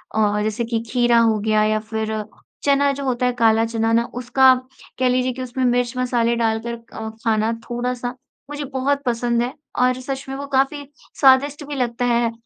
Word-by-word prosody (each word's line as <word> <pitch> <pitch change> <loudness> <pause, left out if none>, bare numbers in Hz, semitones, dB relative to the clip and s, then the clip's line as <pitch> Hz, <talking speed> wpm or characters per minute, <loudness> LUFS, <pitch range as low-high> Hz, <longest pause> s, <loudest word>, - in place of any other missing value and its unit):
और 210 -1 +2
जैसे 215 +2 -1
कि 230 0 -1
खीरा 240 -1 +3
हो 225 -2 +3
गया 215 0 +2
या 215 0 +1
फ़िर 220 0 -3 0.4
चना 280 0 +3
जो 280 0 -5
होता 255 -2 0
है 250 - +1
काला 225 0 +4
चना 225 0 -1
ना, 230 +1 +4
उसका 260 +2 +4 0.5
कह 255 - +3
लीजिए 255 0 +1
कि 260 - -7
उसमें 255 +1 -3
मिर्च-मसाले 245 -1 +1
डालकर 230 0 -1 0.2
अ, 220 - -5
खाना 220 -1 +1 0.2
थोड़ा-सा 245 0 -3 0.4
मुझे 290 0 -5
बहुत 280 +2 0
पसंद 235 -1 0
है 245 +2 -2 0.3
और 255 0 +2
सच 270 +1 -5
में 270 - -4
वो 280 +1 -5
काफ़ी, 275 +1 0 0.3
स्वादिष्ट 275 +2 +4
भी 290 - -5
लगता 245 -2 -1
है 235 -1 +2
245 Hz, 185 wpm, -21 LUFS, 225-260 Hz, 0.5 s, काला